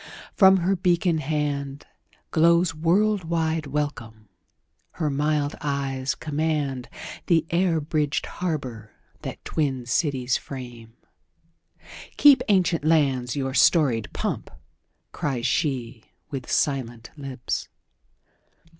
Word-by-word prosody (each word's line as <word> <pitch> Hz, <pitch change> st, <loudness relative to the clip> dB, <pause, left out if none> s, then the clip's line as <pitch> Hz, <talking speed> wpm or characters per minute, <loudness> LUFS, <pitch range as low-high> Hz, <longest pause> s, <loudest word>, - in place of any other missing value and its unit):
From 190 Hz, -1 st, +6 dB
her 185 Hz, +2 st, +1 dB
beacon 175 Hz, -2 st, +1 dB
handGlows 150 Hz, +3 st, -1 dB
world 190 Hz, +6 st, +2 dB
wide 160 Hz, -1 st, -1 dB
welcome; 115 Hz, -7 st, -4 dB, 0.6 s
her 155 Hz, -4 st, -1 dB
mild 145 Hz, +1 st, 0 dB
eyes 140 Hz, -2 st, -2 dB
commandThe 150 Hz, +2 st, -2 dB
air 170 Hz, -1 st, +2 dB
bridged 150 Hz, -1 st, -1 dB
harbour 130 Hz, -11 st, -4 dB, 0.3 s
that -, -, -7 dB
twin 135 Hz, -6 st, -1 dB
cities 130 Hz, -1 st, 0 dB
frame."Keep, 125 Hz, -, -2 dB
ancient 185 Hz, -6 st, +2 dB
lands, 135 Hz, -6 st, +2 dB
your 135 Hz, -2 st, -2 dB
storied 130 Hz, -, +3 dB
pomp!" -, -, -3 dB, 0.6 s
cries 130 Hz, -5 st, -2 dB
sheWith 125 Hz, -, -3 dB
silent 120 Hz, -5 st, -1 dB
lips. 135 Hz, -4 st, -4 dB
145 Hz, 85 wpm, -24 LUFS, 130-165 Hz, 0.6 s, From